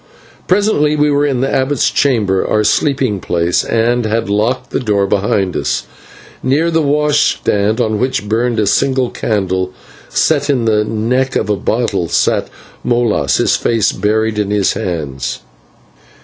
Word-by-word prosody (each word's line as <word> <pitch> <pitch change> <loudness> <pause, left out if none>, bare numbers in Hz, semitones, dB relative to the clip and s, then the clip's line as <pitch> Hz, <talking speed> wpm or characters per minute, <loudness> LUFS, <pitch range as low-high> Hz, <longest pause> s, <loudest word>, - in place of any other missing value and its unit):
Presently 185 -6 +2
we 150 0 +2
were 145 +1 +2
in 130 -3 -1
the 135 - -1
abbot's 135 +1 +1
chamber, 105 -9 +1
our 105 - +1
sleeping 130 -4 +1
place, 85 -1 0
and 120 +2 +1
had 110 -2 -1
locked 125 +5 -1
the - - -1
door 105 -5 +1
behind 95 -1 0
us. - - -1 0.6
Near 150 +6 +1
the 165 0 +2
washstand, 145 -7 +1
on 110 -3 0
which 130 -4 -1
burned 115 +2 0
a 105 - +2
single 130 +5 +1
candle 95 -3 -2 0.4
set 145 -2 +1
in 130 -5 +1
the 105 -1 +2
neck 125 +5 -1
of 105 - 0
a - - +2
bottle, 105 -4 -1
sat - - +1 0.4
Molas, 115 - +1
his - - +2
face 115 -3 +1
buried 110 +2 0
in 105 -1 -1
his 105 -1 +1
hands. 70 -8 -4
115 Hz, 150 wpm, -15 LUFS, 100-135 Hz, 0.6 s, Presently